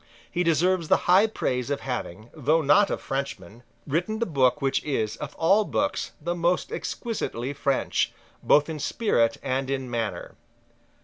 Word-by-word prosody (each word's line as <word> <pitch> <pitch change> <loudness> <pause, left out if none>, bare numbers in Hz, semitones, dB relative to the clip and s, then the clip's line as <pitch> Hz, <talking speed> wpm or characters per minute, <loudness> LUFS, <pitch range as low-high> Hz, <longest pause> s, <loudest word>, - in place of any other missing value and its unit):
He 175 - 0
deserves 170 +1 +2
the - - +2
high 190 +5 +6
praise 125 - -2
of 145 - -2
having, 115 -4 -5
though 155 +2 +1
not 200 +8 +5
a - - -1
Frenchman, 120 -6 -5 0.2
written 175 +9 -1
the 235 - 0
book 135 - +2
which 135 -1 0
is, 110 -8 -1
of 150 - -7
all 195 +6 +4
books, 290 +7 -2
the 170 +3 -2
most 175 - 0
exquisitely 205 - -3
French, 140 -1 0 0.3
both 145 0 +4
in 160 -2 -5
spirit 120 - +1
and 130 0 -1
in 135 -2 -3
manner. 115 -3 -3
145 Hz, 160 wpm, -26 LUFS, 130-180 Hz, 0.3 s, high